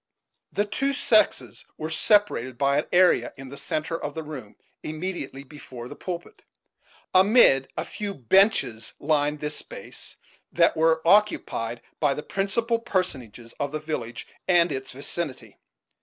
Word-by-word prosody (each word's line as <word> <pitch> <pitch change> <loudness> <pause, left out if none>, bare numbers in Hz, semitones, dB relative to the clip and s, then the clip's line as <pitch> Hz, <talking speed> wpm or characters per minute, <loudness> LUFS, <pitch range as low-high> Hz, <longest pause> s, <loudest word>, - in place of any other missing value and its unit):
The 205 - 0
two 275 +7 -1
sexes 215 -5 +2
were 155 +1 -4
separated 160 - +2
by 140 +2 +2
an - - -3
area 180 0 +4
in 135 -1 -9
the 140 - -8
centre 155 +3 -3
of 145 - -4
the 160 - -4
room 135 -9 -9 0.3
immediately 155 -4 -5
before 130 -4 -10
the - - -9
pulpit; 175 -2 -7 0.7
amid 185 - +6
a - - -2
few 205 -2 -5
benches 140 - +2
lined 150 0 +1
this 150 0 -3
space, - - -9 0.4
that 170 -1 +4
were 160 0 +3
occupied 170 - +2 0.2
by 145 -3 +2
the 150 - -5
principal 230 +4 0
personages 130 - -3
of 140 -1 -2
the 155 - -3
village 125 -7 -5 0.2
and 175 -2 +4
its 135 -1 -4
vicinity. 130 -4 -5
155 Hz, 140 wpm, -25 LUFS, 135-190 Hz, 0.7 s, amid